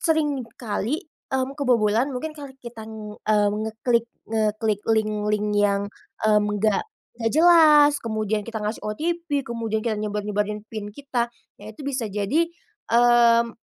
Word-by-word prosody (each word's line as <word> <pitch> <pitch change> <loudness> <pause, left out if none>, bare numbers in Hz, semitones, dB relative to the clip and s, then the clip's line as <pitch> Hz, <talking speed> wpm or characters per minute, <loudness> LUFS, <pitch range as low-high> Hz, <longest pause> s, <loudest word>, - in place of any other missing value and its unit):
sering 310 -4 +1 0.2
kali, 240 - -2 0.2
mmm, 265 0 -1
kebobolan 245 -3 +2
mungkin 280 +4 -4
karena 280 -3 -10
kita, 225 -2 -8 0.4
eee, 210 -1 +4
ngeklik 220 +2 0 0.2
ngeklik 215 -1 0
link-link 210 -1 +1
yang, 205 -1 +2 0.4
mmm, 210 -1 +4
enggak 210 0 +1 0.5
jelas, 305 -3 +7
kemudian 215 -3 -2
kita 225 -2 -5
ngasih 210 +2 -2
OTP, 305 +5 -2
kemudian 230 -3 -3
kita 220 -2 -1
nyebar-nyebarin 210 0 -2
PIN 215 -2 -5
kita, 265 -3 -2 0.3
ya 210 +2 -10
itu 290 - -10
bisa 265 -5 -2
jadi, 210 +12 0 0.5
mmm 235 -1 +5
225 Hz, 125 wpm, -24 LUFS, 210-270 Hz, 0.5 s, jelas